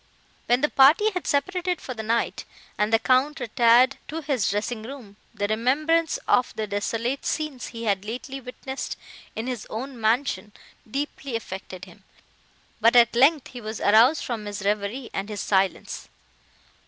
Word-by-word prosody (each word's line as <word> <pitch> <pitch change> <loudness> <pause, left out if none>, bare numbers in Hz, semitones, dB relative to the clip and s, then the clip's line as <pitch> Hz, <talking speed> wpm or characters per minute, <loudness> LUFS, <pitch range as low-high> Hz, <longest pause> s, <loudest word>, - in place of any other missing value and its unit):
When 245 +2 +3
the 295 - +2
party 315 +11 +5
had 365 -3 -4
separated 360 +4 0
for 255 - -6
the 220 - -6
night, 230 +2 -1 0.3
and 210 +1 0
the 225 - +6
Count 260 +6 +2
retired 245 +2 +4
to 320 +2 -5
his 270 -8 0
dressing 215 +3 -2
room, 230 -4 -10 0.2
the 205 - -2
remembrance 300 +9 +1
of 250 - +2
the 220 - -2
desolate 225 +6 -2
scenes 305 -5 -3
he 230 -1 -8
had 200 -3 0
lately 255 +5 -6
witnessed 265 +2 -6 0.4
in 220 - -3
his 250 -4 -4
own 250 +2 -6
mansion 220 -1 0 0.4
deeply 275 0 -4
affected 190 -4 -6
him, - - -17 0.8
but 230 +2 +4
at 235 -1 +6
length 275 +3 +4
he 245 - -9
was 215 0 -5
aroused 230 +9 +5
from 225 -4 -4
his 205 -1 -5
reverie 210 +5 -2
and 195 +2 -3
his 205 -3 -4
silence. 190 -1 -1
240 Hz, 160 wpm, -25 LUFS, 215-275 Hz, 0.8 s, the